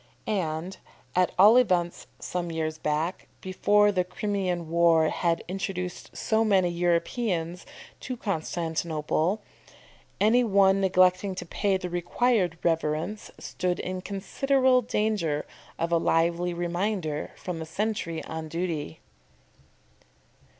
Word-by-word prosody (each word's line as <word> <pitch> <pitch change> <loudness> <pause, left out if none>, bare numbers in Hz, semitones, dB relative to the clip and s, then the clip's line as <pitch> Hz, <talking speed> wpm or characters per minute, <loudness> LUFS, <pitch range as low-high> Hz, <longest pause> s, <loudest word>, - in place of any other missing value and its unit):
And 175 -2 -2 0.4
at 180 0 +3
all 210 +6 +8
events 180 -8 +1
some 175 -1 -4
years 155 -1 -3
back, 155 +5 -2
before 205 +2 +3
the 185 -2 +1
Crimean 180 -2 -2
war 165 -1 +4
had 170 -1 0
introduced 180 -1 -5
so 220 0 +1
many 195 -5 +3
Europeans 175 +1 -1 0.3
to 255 -1 -5
Constantinople 165 0 -1 0.8
any 230 +4 +4
one 195 -3 +4
neglecting 185 0 +3
to - - -6
pay 195 +3 0
the 185 -1 -5
required 175 +1 +1
reverence, 165 +5 -1
stood 180 -1 -2
in 185 0 -4
considerable 255 +7 +2
danger 210 -10 -1 0.3
of 170 0 -2
a 170 - +4
lively 170 +2 +1
reminder 175 -2 -2
from 180 -3 -5
the 160 - -5
sentry 180 -2 -2
on 160 0 -6
duty. 165 - -4
180 Hz, 115 wpm, -27 LUFS, 165-200 Hz, 0.8 s, all